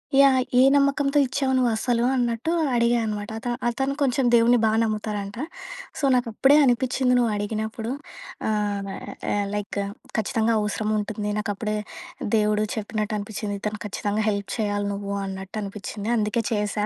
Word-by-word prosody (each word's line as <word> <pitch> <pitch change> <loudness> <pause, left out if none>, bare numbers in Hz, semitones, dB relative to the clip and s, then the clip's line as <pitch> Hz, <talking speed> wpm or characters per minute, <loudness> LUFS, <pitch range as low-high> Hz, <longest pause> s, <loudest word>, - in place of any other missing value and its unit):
Yeah! 270 -2 +6 0.2
ఏ - - +8
నమ్మకంతో 280 0 +2
ఇచ్చావు 265 +1 0
నువ్వసలూ 240 -1 +1
అన్నట్టు 240 +5 0 0.2
అడిగా 235 0 +3
అనమాట. 210 0 -3
అత 245 - -7 0.2
అతను 270 +3 -1
కొంచెం 265 -1 +2
దేవుడిని 235 +1 +5
బా - - +4
నమ్ముతారంట. 210 -1 -3 0.6
సో, - - -7
నాకప్పుడే 250 +3 +3
అనిపిచ్చింది 250 +1 +2
నువ్వడిగినప్పుడు, 220 0 -1 0.6
ఆహ్, 205 -1 0
న - - -6 0.4
ఆహ్, 205 -1 0
"లైక్ 205 0 -3 0.4
ఖచ్చితంగా 220 +2 +1
అవసరముంటుంది, 210 0 -1
నాకప్పుడే 210 +1 -2 0.6
దేవుడు 210 0 +2
చెప్పినట్టు 215 0 -2
అనిపిచ్చింది, 205 0 -4
ఇతను 210 0 -3
ఖచ్చితంగా 210 +1 -1
హెల్ప్ 200 -1 -2
చెయ్యాలి 205 -1 0
నువ్వు 200 0 -5
అన్నట్టు 190 +2 -6
అనిపిచ్చింది, 205 +2 -5
అందుకే 215 +2 0
చేశా" 210 0 0
215 Hz, 130 wpm, -24 LUFS, 205-240 Hz, 0.6 s, ఏ